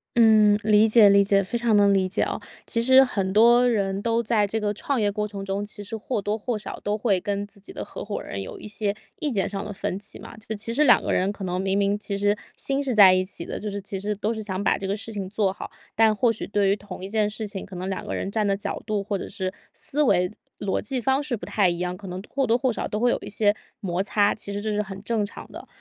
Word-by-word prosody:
嗯， 215 -3 +6
理 215 +1 +5
解 215 -1 +7
理 200 0 +6
解， 195 0 +3
非 190 - -5
常 235 -2 +2
能 200 -1 +5
理 190 -1 +2
解 - - +1
哦。 - - -3 0.2
其 230 - 0
实， 260 +2 +7
很 195 -7 -1
多 235 +4 +6
人 200 -4 0
都 230 +1 +1
在 215 -2 +2
这 220 +3 -2
个 210 -1 -1
创 265 +5 -2
业 205 -2 +2
过 210 +1 -2
程 200 -1 -7
中， 195 +1 -2
其 205 0 -8
实 210 +3 -6
或 220 +2 -3
多 205 +1 -1
或 225 +1 -3
少 210 - -7
都 205 +1 0
会 200 -4 +1
跟 200 +1 -2
自 205 0 -13
己 200 - -12
的 - - -6
合 - - -8
伙 - - -4
人 100 - -5
有 95 - -8
一 - - -9
些 210 -1 -2 0.3
意 300 - -1
见 200 -5 0
上 195 -1 -4
的 210 - -6
分 190 -1 -3
歧 205 - -7
嘛。 - - -10
就 220 0 -6
其 225 +3 -4
实 295 +5 +3
两 245 - +6
个 - - -1
人 190 +2 +1
可 205 -1 -8
能 180 0 -2
明 195 0 0
明 200 0 +2
其 205 -1 -4
实 205 +1 +2 0.2
心 275 +1 -1
是 260 -4 -1
在 195 -3 +9
一 185 0 +2
起 185 -3 -7
的， - - -5
就 210 - -4
是， 205 0 -4
其 195 0 -5
实 210 +2 -2
都 210 +3 -1
是 220 - -5
想 195 -2 -3
把 - - +2
这 195 - -4
个 200 +2 -1
事 225 +1 -7
情 195 -3 -4
做 200 -2 0
好。 - - -8 0.3
但 220 0 +5
或 230 +3 +2
许 220 - -5
对 200 -1 +2
于 200 - +3
同 200 -3 -9
一 - - -7
件 210 0 +1
事 220 +1 -5
情， 200 -2 -6
可 190 - -11
能 180 +1 -4
两 190 -1 -3
个 - - -3
人 195 - -3
站 215 0 0
的 200 -1 +1
角 200 - -4
度， 210 -2 -1
或 205 0 -2
者 195 - -5
是 190 -3 -3 0.2
思 300 -1 -2
维、 180 -10 +3 0.3
逻 195 - -1
辑 255 +4 -3
方 265 +3 +1
式 280 -5 -2
不 - - -8
太 200 -4 +2
一 170 - -2
样， 180 +1 -2
可 195 +1 -10
能 180 0 -5
或 270 -1 -1
多 230 - +3
或 250 -1 0
少 - - -3
都 210 - -3
会 245 +1 +3
有 - - 0
一 - - -8
些 205 0 +2 0.2
摩 185 -4 -1
擦， 205 +1 +2
其 205 -1 -7
实 200 - -3
这 215 +1 -2
是 210 - +1
很 195 -1 -7
正 220 -1 0
常 205 - -8
的。 - - -10
205 Hz, 315 characters per minute, -24 LUFS, 195-220 Hz, 0.3 s, 在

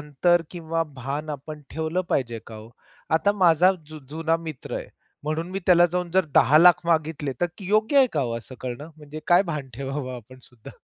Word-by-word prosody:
अंतर 165 +4 +2
किंवा 165 -1 -2 0.2
भान 140 +4 -4
आपण 150 +1 -7
ठेवलं 160 +3 -2
पाहिजे 120 -4 0
का 110 - -9
ओ? 110 +1 -12 0.5
आता 200 +5 +2
माझा 175 +3 +5
जु 155 0 -10
जुना 165 +2 0
मित्र 155 -5 -6
आहे - - -6 0.4
म्हणून 160 +3 -3
मी 190 - -3
त्याला 175 -1 +6
जाऊन 180 -1 -2
जर 190 0 +3
10,00,000 165 +5 +6
मागितले 155 -4 0
तर 175 - +3
योग्य 215 +8 +1
आहे 265 - +7
का 145 -3 +1
ओ 115 -1 -3
असं 125 +3 -12
करण? 125 0 -5 0.2
म्हणजे 150 0 -10
काय 175 +2 +5
भान 145 -3 -5
ठेवावं 135 0 -4
आपण 125 +3 -13
सुद्धा? 120 -3 -14
155 Hz, 190 wpm, -24 LUFS, 135-175 Hz, 0.5 s, आहे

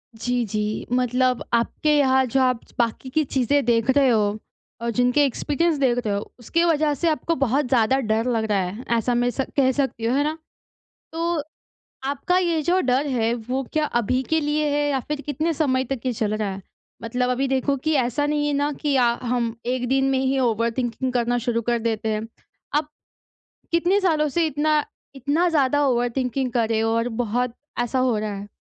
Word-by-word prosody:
जी, 245 +2 -1
जी। 210 0 -2
मतलब 250 0 +1
आपके 295 +6 +2
यहाँ 265 -2 +4
जो 255 +2 0
आप 255 -2 +1
च - - -23
बाकी 235 +2 -1
की 310 +4 +1
चीज़ें 275 +1 +1
देख 235 0 +2
रहे 270 0 +4
हो 210 -2 +2 0.4
और 235 - -1
जिनके 245 +5 +3
एक्सपीरियंस 300 +4 0
देख 255 -3 +2
रहे 210 - 0
हो, 200 - -5
उसकी 335 +8 0
वजह 310 -3 +2
से 335 +5 -1
आपको 325 +1 0
बहुत 275 +1 +1
ज़्यादा 245 +1 +3
डर 225 -1 0
लग 225 -1 0
रहा 200 - +3
है 195 +7 -6
ऐसा 235 +2 0
मैं 245 +1 +2
स 255 - -2 0.2
कह 260 -2 +4
सकती 265 -4 -2
हूँ। 240 +3 +1
है 285 - +2
ना? 310 +2 -2 0.7
तो 335 0 -1 0.6
आपका 285 +6 0
ये 340 -3 +1
जो 350 +5 +2
डर 260 +3 +1
है 235 -4 +1
वो 250 +3 -3
क्या 310 -1 +2
अभी 245 -1 0
के 320 - +3
लिए 300 0 0
है 290 0 +1
या 275 -2 +1
फिर 300 -1 -3
कितने 305 +3 -1
समय 265 -4 +1
तक 265 -4 -2
ये 255 - 0
चल 215 -2 -1
रहा 215 -2 -2
है? 190 +1 -7 0.4
मतलब 250 +2 -1
अभी 255 +2 0
देखो 270 +1 +1
कि 310 +4 -1
ऐसा 265 +2 +1
नहीं 295 0 0
है 295 - 0
ना 285 +1 +1
कि 290 -2 +1
अ, 260 - +4 0.2
हम 240 -2 -1
एक 250 0 -1
दिन 270 0 +2
में 265 - +1
ही 265 0 +1
ओवरथिंकिंग 235 +1 0
करना 245 0 +1
शुरू 235 0 -1
कर 235 +1 0
देते 220 -1 -1
हैं। 215 +1 -2 0.5
आप, 295 0 +1 0.8
कितने 350 +4 +3
सालों 315 -5 +2
से 335 +4 +1
इतना, 300 +1 +1 0.3
इतना 290 +7 +1
ज़्यादा 290 -2 +2
ओवरथिंकिंग 250 +1 0
कर 230 -2 0
रहे 225 -1 +1
हो 225 0 +1
और 230 +1 0
बहुत 240 +2 -1 0.3
ऐसा 250 +2 -1
हो 255 -3 +2
रहा 210 -1 -3
है? 200 +1 -7
255 Hz, 205 wpm, -23 LUFS, 235-290 Hz, 0.8 s, यहाँ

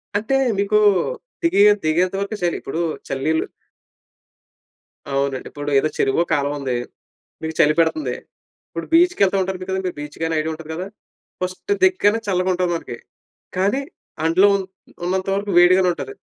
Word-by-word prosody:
అంటే, 220 +6 0 0.2
మీకూ 205 +1 +2 0.6
దిగే 270 -12 +4 0.2
దిగేంత 175 +4 +1
వరకే 200 +2 -3
చలి. 175 - +1
ఇప్పుడూ 160 - -4 0.3
చల్లనీళ్ళు 155 +4 -1 1.7
అవునండి. 135 -1 -1
ఇప్పుడు 145 0 -5
ఏదో 155 +3 0
చెరువో, 135 +5 +2
కాలవుంది. 140 -3 -1 0.7
మీకు 160 0 -3
చలి 150 - +5
పెడతంది. 155 -6 +1 0.5
ఇప్పుడు 165 - -6
బీచ్‌కెళ్తా 330 - +4
ఉంటారు 190 0 -3
మి 185 - -7
కదండి! 190 -1 -1
బీచ్‌గైనా 160 +2 -3
ఐడియా 160 +1 -2
ఉంటది 160 0 -10
గదా! 180 +4 -5 0.5
ఫస్ట్ 185 - -4
దిగగానే 230 - +4
చల్లగుంటది 180 -1 +1
మనకి. 120 -7 -6 0.6
కానీ, 200 +9 +1 0.4
అందులో 185 +5 +5 0.6
ఉన్నంత 185 +1 -1
వరకు 200 0 -2
వేడిగానే 185 +1 +5
ఉంటది. 410 - -7
180 Hz, 130 wpm, -21 LUFS, 155-195 Hz, 1.7 s, చలి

